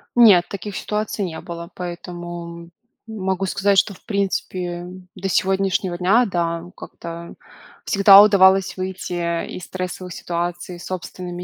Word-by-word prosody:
Нет, 210 -8 +7
таких 200 0 -6
ситуаций 210 -1 -2
не 165 -3 -6
было, 170 0 -8
поэтому 175 -1 -7 0.4
могу 190 -3 -2
сказать, 200 +1 +1
что 200 - 0
в - - -22
принципе 185 -4 -2 0.3
до 195 +1 -4
сегодняшнего 190 -1 0
дня, 200 +8 +4
да, 170 -4 -1
как-то 170 0 -9 0.5
всегда 200 0 +8
удавалось 195 -2 +5
выйти 185 0 -4 0.3
из 180 - -8
стрессовых 185 -1 -5
ситуаций 175 +1 -4
собственными 180 0 -6
185 Hz, 120 wpm, -21 LUFS, 175-195 Hz, 0.5 s, всегда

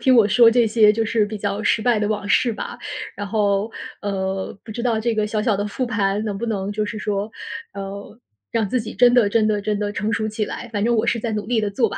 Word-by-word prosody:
听 260 -2 +4
我 225 - +6
说 235 +1 +6
这 235 0 +4
些 215 -1 +5
就 225 +1 0
是 220 -1 +1
比 215 +1 -5
较 205 0 -2
失 215 - +2
败 240 -3 +3
的 210 - 0
往 205 -1 -2
事 235 +2 +3
吧。 - - -6 0.4
然 205 - -4
后， 205 +1 0 0.3
呃， 190 -1 -3
不 220 - -11
知 235 +2 -5
道 225 -3 +1
这 230 0 0
个 215 - +1
小 210 0 -1
小 215 -4 +2
的 205 +1 -2
复 255 +5 -2
盘 205 -2 0
能 205 -2 -3
不 235 - -3
能 200 -3 -2
就 210 0 -1
是 215 - -5
说， 210 0 -2 0.4
呃， 200 +2 -7 0.4
让 220 -3 +1
自 250 +2 0
己 220 - -7
真 245 -1 +5
的 230 -5 +5
真 215 0 +2
的 210 -1 +1
真 210 0 -1
的 205 0 -1
成 215 +2 -2
熟 220 -1 0
起 215 0 -2
来， 240 - -6
反 205 0 0
正 235 0 +2
我 220 +1 +2
是 235 - +2
在 225 0 -3
努 210 -1 -2
力 235 -2 +1
地 205 -1 -1
做 230 +3 +1
吧。 - - -6
215 Hz, 290 characters per minute, -22 LUFS, 205-230 Hz, 0.4 s, 我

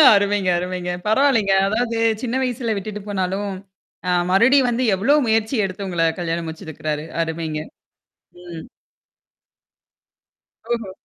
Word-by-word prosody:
அருமைங்க, 200 -1 +1
அருமைங்க. 180 0 -3 0.2
பரவாயில்லங்க. 220 -4 +3
அதாவது 230 +3 -1 0.3
சின்ன 245 -1 -2
வயசுல 240 -3 -1
விட்டுட்டு 210 +1 -5
போனாலும், 195 +1 -2 0.6
ஆ - - +3 0.2
மறுபடியும் 250 +6 +5
வந்து 240 +2 0
எவ்ளோ 230 +10 +3
முயற்சி 220 +3 +1
எடுத்து 195 +1 -5
உங்கள 170 -3 +1
கல்யாணம் 170 -1 -2
முடிச்சுருக்கறாரு! 155 -1 -5 0.2
அருமைங்க. 160 -1 -4 0.8
ம். 170 -2 -9 2.1
ஓஹோ! 225 -5 -4
200 Hz, 110 wpm, -21 LUFS, 175-230 Hz, 2.1 s, மறுபடியும்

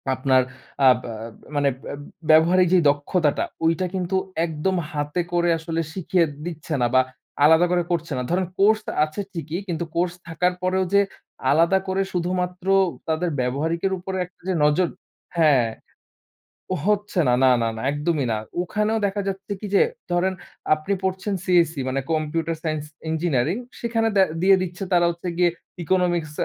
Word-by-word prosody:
আপনার 130 0 +3 0.5
আব 125 - +5 0.2
আ - - -6 0.4
মানে 145 -1 +3 0.2
ব্য - - -5 0.4
ব্যবহারিক 175 +3 +6
যে - - +7
দক্ষতাটা, 145 +2 0 0.2
ওইটা 165 +3 +2
কিন্তু 185 0 -1 0.3
একদম 160 +4 -1 0.2
হাতে 150 +3 -2
করে 175 0 +2
আসলে 165 0 -3
শিখিয়ে 185 -1 +1 0.2
দিচ্ছে 160 -2 -5
না 120 - +3
বা 130 - +7 0.4
আলাদা 160 +3 +6
করে 175 0 +3
করছে 165 -2 -2
না। 125 - -1
ধরেন 185 +1 +1
কোর্স 215 +2 +4 0.2
আছে 155 +6 -6
ঠিকই, 165 0 -4
কিন্তু 170 -1 -2
কোর্স 175 +1 +1
থাকার 180 +3 +1
পরেও 185 +1 +1
যে 200 - +7 0.5
আলাদা 170 +5 +4
করে 190 +1 +1
শুধুমাত্র 180 +1 -2 0.4
তাদের 160 +2 0
ব্যবহারিকের 160 +9 -1
উপরে 190 +1 -5
একটা 180 - -19
যে 185 - +1
নজর 155 +4 +3 0.5
হ্যাঁ। 140 -7 +4 1.2
হচ্ছে 205 -2 +1
না, 125 - +4
না 130 - +6
না 115 - +1
না, 110 - -6
একদমই 145 -1 0
না। 110 - 0 0.2
ওখানেও 215 +4 0
দেখা 200 +1 -1
যাচ্ছে 195 +1 -5
কি? - - -6
যে, - - +6 0.3
ধরেন 180 +2 +1 0.4
আপনি 155 +6 -1
পড়ছেন 190 +2 -1
CSE 170 -5 +2
মানে 135 +1 -1
কম্পিউটার 160 +1 -1
সাইন্স 155 -2 -2 0.3
ইঞ্জিনিয়ারিং 160 - 0 0.2
সেখানে 230 -1 0
দে 195 - +7 0.2
দিয়ে 195 +1 +6
দিচ্ছে 180 0 -4
তারা 175 -1 +5
হচ্ছে 170 +1 -6
গিয়ে 180 -1 +4 0.3
ইকোনমিক্স 175 -2 +1
175 Hz, 155 wpm, -23 LUFS, 155-185 Hz, 1.2 s, যে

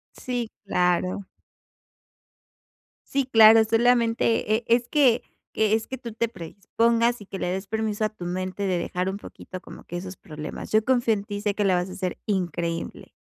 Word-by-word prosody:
Sí, 245 -3 -3
claro. 180 0 0 1.8
Sí, 275 -1 0
claro. 225 -2 +8
Solamente, 230 -1 +2
eh, 230 +2 -1
es 235 +1 +3
que 260 -6 +4 0.3
que 215 0 +2
es 225 0 -1
que 260 - -6
tú 235 -3 -8
te 230 +1 0
predispongas 230 +5 0
y 205 - -11
que 195 - -7
le 180 - -2
des 190 +2 -3
permiso 220 0 -1
a - - -1
tu 215 -5 -10
mente 185 +2 -3
de 185 -3 +1
dejar 180 +2 -2
un 195 - -5
poquito 185 -2 -10
como - - -12
que 175 - -5
esos 185 +1 -7
problemas. 155 -1 -8
Yo 215 0 +4
confío 240 -1 +2
en 200 -1 -1
ti 205 -1 -5
y - - -4
sé 205 -1 0
que 210 - 0
lo 190 -2 +3
vas 180 +1 -1
a - - -7
ser 185 -2 -3
increíble. 175 -4 -3
210 Hz, 190 wpm, -25 LUFS, 185-230 Hz, 1.8 s, claro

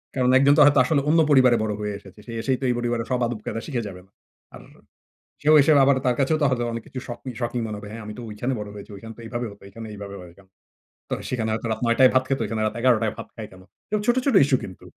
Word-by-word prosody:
কারণ 125 -1 +2
একজন 140 +2 +5
তো - - +7
হয়তো 145 -2 +5
আসলে 140 +2 +1
অন্য 165 +1 +4
পরিবারে 130 -4 +5
বড় 105 -1 -1
হয়ে 105 -1 -3
এসেছে। 100 0 -16
সে 120 - -9
এসেই 130 +1 0
তো - - -8
এই - - +2
পরিবারে 120 -1 -1
সব 125 - +1
আদব-কায়দা 115 -1 -5
শিখে 125 -6 -2
যাবে 90 -2 -9
না। 95 - -33 0.4
আর - - -11 0.8
সেও 155 +1 +5
এসে 145 - +3
আবার 140 -1 +4
তার 125 - +2
কাছেও 145 +4 +2
তো - - +3
হয়তো 120 -2 0
অনেক 115 -1 -5
কিছু 130 - -7
শকি 120 +2 -7
শকিং 120 0 -2
মনে 105 -1 -5
হবে 105 0 -9
হ্যাঁ, 115 0 -8
"আমি 105 - -7
তো - - -6
ঐখানে 120 +5 -3
বড় 105 -1 -6
হয়েছি। 100 +1 -10
ওইখানে 115 +3 -10
তো - - -13
এইভাবে 120 +1 -4
হত। 100 - -17
এখানে 115 +2 -9
এইভাবে 100 -1 -8
হয় 90 -1 -12
কেন?" 95 - -19 0.6
তো - - -2 0.2
সেখানে 115 -3 -2
হয়তো 115 +1 -3
রাত - - -2
৯ঃ০০ 115 0 +2
টায় 130 - +8
ভাত 130 0 +3
খেত, 135 - -1
ওখানে 110 +1 -3
রাত 110 - -1
১১ 125 -1 +4
টায় 110 - 0
ভাত - - -8
খায় 110 -2 -7
কেন? 95 - -15 0.5
ছোট, 240 - +4
ছোট 275 -7 +2
ইশ্যু 135 -2 +2
কিন্তু, 95 - -10
120 Hz, 270 wpm, -23 LUFS, 105-130 Hz, 0.8 s, টায়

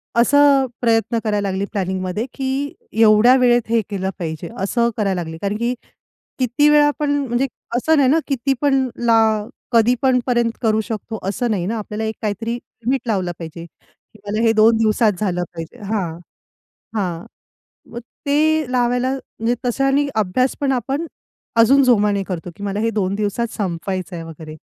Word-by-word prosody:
असं 280 +3 +5
अ, - - 0 0.2
प्रयत्न 230 0 +2
करायला 205 -2 0
लागले 190 +1 -2
प्लॅनिंगमध्ये, 190 +2 -2
की 270 +2 -2 0.3
एवढ्या 220 +4 +6
वेळेत 240 -1 +4
हे 230 -1 +3
केलं 190 -2 -2
पाहिजे 160 0 -5
असं 235 +3 +1
करायला 195 -4 0
लागले. 160 -1 -7
कारण, 200 +1 -1
की 240 +2 0 0.7
किती 255 +4 +2
वेळा 295 0 +5
पण 295 -1 0 0.2
म्हणजे 240 +3 0 0.3
असं 315 +5 +2
नाही 265 -2 +4
ना 320 +3 +4
किती 275 0 0
पण 270 -2 +2 0.2
ला 230 -1 +5 0.5
कधीपण 250 +2 +3
पर्यंत 240 -2 +2
करू 220 -1 +2
शकतो 220 0 -5
असं 235 +3 -1
नाही 180 -4 -1
ना 225 +3 -2
आपल्याला 210 +1 -5
एक 220 0 -2
काहीतरी 220 +2 -2
लिमिट 245 +1 -3
लावलं 185 -5 0
पाहिजे, 165 0 -8
की 215 +5 -24
मला 215 +2 -1
हे 225 -1 +4
2 220 +1 +5
दिवसात 215 0 +3
झालं 180 -4 -1
पाहिजे. 165 -1 -8
हां, 190 -6 -3 0.8
हां, 175 -4 -2 0.7
मग 235 - -5 0.3
ते 305 -1 +2
लावायला 245 +1 +1
म्हणजे 240 -3 -3
तशानी 270 +3 +2
अभ्यासपण 255 +7 +1
आपण 270 +6 -2 0.5
अजून 275 +5 +6
जोमाने 205 -5 +3
करतो, 175 -2 -5
की 205 - -11
मला 200 +1 -2
हे 230 0 +1
2 195 -3 -1
दिवसात 210 +3 -1
संपवायचं 185 -1 -3
आहे 165 - -6
वगैरे. 160 -1 -10
225 Hz, 165 wpm, -20 LUFS, 195-255 Hz, 0.8 s, एवढ्या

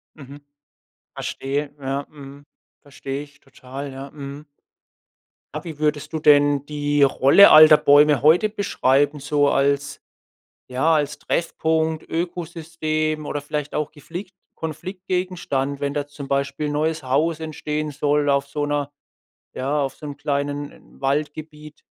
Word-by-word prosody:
Mhm. 140 -1 -12 0.7
Verstehe. 140 +1 -4
Ja, 135 +1 -3
mhm. 140 -1 -12 0.4
Verstehe 140 0 -6
ich 145 0 -16
total. 135 +1 -9
Ja, 135 +1 -8
mhm. 140 0 -9 1.1
Ja - - -4
wie 160 -4 -8
würdest 150 +1 -1
du 160 - -1
denn 145 -2 +4
die 145 -1 -1
Rolle 140 +7 +7
alter 155 0 +9
Bäume 145 -1 +5
heute 170 +8 +5
beschreiben? 145 -8 +1
So 145 0 +1
als 140 0 0 0.7
ja, 145 +6 +2
als 150 0 -1
Treffpunkt, 160 -1 -1
Ökosystem 160 -2 -3
oder 145 - -3
vielleicht 145 0 -4
auch 150 -1 -2
geflickt 175 +6 -9 0.2
Konfliktgegenstand, 180 -4 -3
wenn 140 0 -2
da 145 -1 -3
zum 145 -1 -9
Beispiel 140 +2 -1
neues 155 +1 -1
Haus 150 +5 0
entstehen 155 -1 -4
soll 145 +1 0
auf 140 0 +1
so 145 +1 -2
'ner 145 -1 -2 0.6
ja, 140 +3 -1
auf 135 -1 -3
so 150 - -9
'n 145 -1 -7
kleinen 145 0 -4
Waldgebiet. 150 +2 -4
145 Hz, 130 wpm, -22 LUFS, 140-155 Hz, 1.1 s, alter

